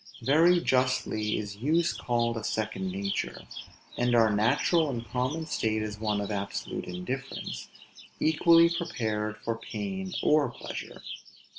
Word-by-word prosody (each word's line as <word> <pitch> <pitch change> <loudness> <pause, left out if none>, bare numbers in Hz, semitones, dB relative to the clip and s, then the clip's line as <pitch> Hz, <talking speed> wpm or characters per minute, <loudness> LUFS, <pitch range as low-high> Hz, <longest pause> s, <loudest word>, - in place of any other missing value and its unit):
Very 165 +6 +5
justly 125 -7 +1
is 100 -1 -5
use 160 +8 +2
called 120 -1 0
a 115 - -4
second 105 -4 -2
nature; 100 +1 -3 0.5
and 120 0 +2
our 110 -2 +5
natural 140 - +3
and 120 -3 -4
common 130 +6 -1
state 110 -7 0
is 105 0 -5
one 105 -2 0
of 100 0 -3
absolute 100 -1 -3
indifference, 125 +10 -5 0.5
equally 165 +2 +6
prepared 110 -10 -2
for 115 - 0
pain 190 -2 -4
or 150 -3 +4
pleasure. - - -8
120 Hz, 130 wpm, -28 LUFS, 105-155 Hz, 0.5 s, equally